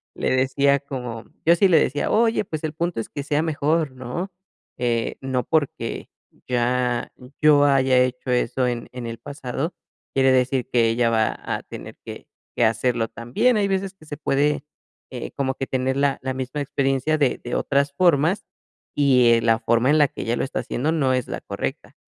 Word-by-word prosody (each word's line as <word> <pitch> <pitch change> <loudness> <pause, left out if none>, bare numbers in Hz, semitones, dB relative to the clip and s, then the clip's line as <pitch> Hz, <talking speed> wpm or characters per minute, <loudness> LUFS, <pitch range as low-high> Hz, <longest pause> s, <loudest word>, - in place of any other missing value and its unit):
le - - -1
decía 135 +2 +2
como 125 -5 -6 0.2
yo 170 +1 +6
sí 195 +3 +4
le 165 - +6
decía: 145 +2 0
"Oye, 225 0 +3
pues, 155 -3 -5
el 155 - -3
punto 170 -4 -2
es 115 - -4
que 140 - -5
sea 145 +1 0
mejor", 155 -1 0
¿no? 130 +9 -5 0.4
Eh, 120 -2 -1
no 130 -1 -1
porque 155 -4 -1 0.4
ya 125 0 0 0.3
yo 150 -1 +6
haya 135 -2 +4
hecho 125 0 0
eso 125 +1 +1
en 120 -1 -3
en 125 -2 -7
el 115 0 -5
pasado, 140 +3 -4 0.4
quiere 135 -1 +4
decir 130 0 +1
que 115 -2 +3
ella 115 0 +2
va 110 -1 +1
a - - -4
tener - - -10
que - - -9 0.3
que 120 - +3
hacerlo 115 0 +1
también. 130 - +1
Hay 200 -1 +2
veces 195 0 -1
que 155 - -18
se 145 - -6
puede, 145 0 +1 0.5
eh, 125 -2 -6
como 135 -1 -1
que 135 - -4
tener 130 +1 -1
la 140 -1 +1
la 130 0 -2
misma 130 +3 -4
experiencia 140 +2 0
de 140 -4 +1
de 120 - -3
otras 140 0 +1
formas, 170 +2 +2 0.5
y, 130 -4 +5
eh, 115 - +3
la 115 -1 +3
forma 115 +3 +2
en 155 - +5
la 145 - +5
que - - -8
ella 115 +1 0
lo - - -1
está 135 - -3
haciendo 145 +6 -1
no 135 -5 +1
es 125 -1 -1
la - - -5
correcta. - - -5
135 Hz, 195 wpm, -23 LUFS, 125-150 Hz, 0.5 s, yo